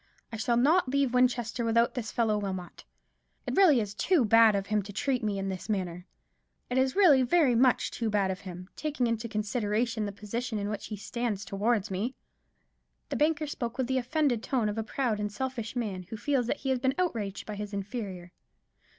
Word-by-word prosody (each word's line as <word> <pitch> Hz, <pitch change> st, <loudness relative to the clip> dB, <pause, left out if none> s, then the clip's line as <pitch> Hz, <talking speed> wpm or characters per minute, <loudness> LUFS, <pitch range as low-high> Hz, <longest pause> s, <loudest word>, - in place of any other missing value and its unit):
"I 225 Hz, -, -5 dB
shall 235 Hz, +2 st, +1 dB
not 295 Hz, +4 st, +4 dB
leave 275 Hz, -2 st, +1 dB
Winchester 245 Hz, -1 st, +1 dB
without 230 Hz, +1 st, +2 dB
this 225 Hz, -4 st, -4 dB
fellow 225 Hz, -3 st, +1 dB
Wilmot. 190 Hz, -3 st, -6 dB, 0.6 s
It -, -, -2 dB
is -, -, -2 dB
really 300 Hz, -, +6 dB
too 245 Hz, -, +1 dB
bad 225 Hz, 0 st, +6 dB
of 195 Hz, -1 st, -1 dB
him 210 Hz, 0 st, +1 dB
to 200 Hz, +1 st, -9 dB
treat 250 Hz, +4 st, -1 dB
me 205 Hz, -2 st, -1 dB
in 195 Hz, 0 st, -2 dB
this 190 Hz, +3 st, -6 dB
manner. 180 Hz, -3 st, -3 dB, 0.6 s
It 255 Hz, -, +2 dB
is 260 Hz, 0 st, +1 dB
really 330 Hz, -10 st, +6 dB
very 265 Hz, +1 st, +3 dB
much 250 Hz, +1 st, +3 dB
too 230 Hz, -2 st, -2 dB
bad 200 Hz, -2 st, +1 dB
of 185 Hz, -, -5 dB
him, 180 Hz, -2 st, -9 dB
taking 300 Hz, -5 st, -1 dB
into 230 Hz, 0 st, -1 dB
consideration 215 Hz, +1 st, -1 dB
the -, -, -4 dB
position 220 Hz, +3 st, -4 dB
in 205 Hz, 0 st, -2 dB
which 210 Hz, -, -4 dB
he 210 Hz, -, -5 dB
stands 215 Hz, -1 st, -3 dB
towards 205 Hz, 0 st, 0 dB
me." 215 Hz, +8 st, -2 dB, 0.9 s
The -, -, -2 dB
banker 305 Hz, +1 st, +2 dB
spoke 240 Hz, -5 st, -4 dB
with 260 Hz, -, +1 dB
the 260 Hz, +1 st, 0 dB
offended 255 Hz, -2 st, 0 dB
tone 240 Hz, -5 st, 0 dB
of 210 Hz, +2 st, -3 dB
a -, -, -1 dB
proud 225 Hz, -1 st, -1 dB
and 210 Hz, 0 st, -2 dB
selfish 245 Hz, 0 st, -4 dB
man, 210 Hz, -6 st, -2 dB
who 220 Hz, -, -5 dB
feels 255 Hz, +1 st, 0 dB
that 285 Hz, -, 0 dB
he 270 Hz, -, -2 dB
has 260 Hz, -, +1 dB
been 265 Hz, +2 st, +1 dB
outraged 225 Hz, -, -2 dB
by 210 Hz, -, -6 dB
his 205 Hz, 0 st, -5 dB
inferior. 200 Hz, -3 st, -5 dB
230 Hz, 205 wpm, -29 LUFS, 205-255 Hz, 0.9 s, really